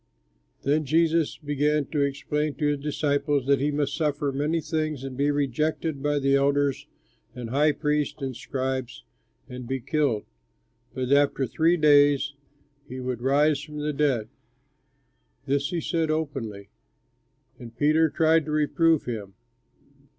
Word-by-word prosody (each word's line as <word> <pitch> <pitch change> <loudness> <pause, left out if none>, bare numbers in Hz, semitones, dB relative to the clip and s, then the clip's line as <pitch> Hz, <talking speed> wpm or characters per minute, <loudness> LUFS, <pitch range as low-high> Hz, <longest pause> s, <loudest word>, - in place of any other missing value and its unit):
Then 150 +3 +2
Jesus 160 +2 +1
began 145 0 0
to 150 - 0
explain 145 +1 -1
to 150 - -2
his 145 -1 -1
disciples 145 -1 0
that 140 0 +3
he 145 +2 +1
must 145 -1 -1
suffer 145 -3 -1
many 150 +5 0
things 155 -4 -3
and 135 -1 -6
be 140 +2 +1
rejected 145 +2 -1
by 145 0 0
the 140 -1 +2
elders 140 0 +1 0.5
and 120 -2 -6
high 150 +3 +3
priests 150 +1 -1
and 135 -3 -4
scribes 130 -1 -4 0.4
and 125 -1 -8
be 135 +1 -2
killed, 130 -4 0 0.7
but 130 -1 -2
that 140 0 +5
after 135 - -2
three 165 +6 +2
days 145 -2 +4 0.6
he 130 - -6
would 125 -2 -4
rise 140 +2 +2
from 150 +1 -9
the 150 0 -2
dead. 135 -7 +1 1.2
This 140 +1 0
he 175 -2 -2
said 165 0 -1
openly; 130 -11 -3 0.9
and 115 -1 -11
Peter 155 +3 +3
tried 160 0 +3
to 155 - -4
reprove 155 +1 +2
him. 105 -5 -6
145 Hz, 145 wpm, -25 LUFS, 135-150 Hz, 1.2 s, that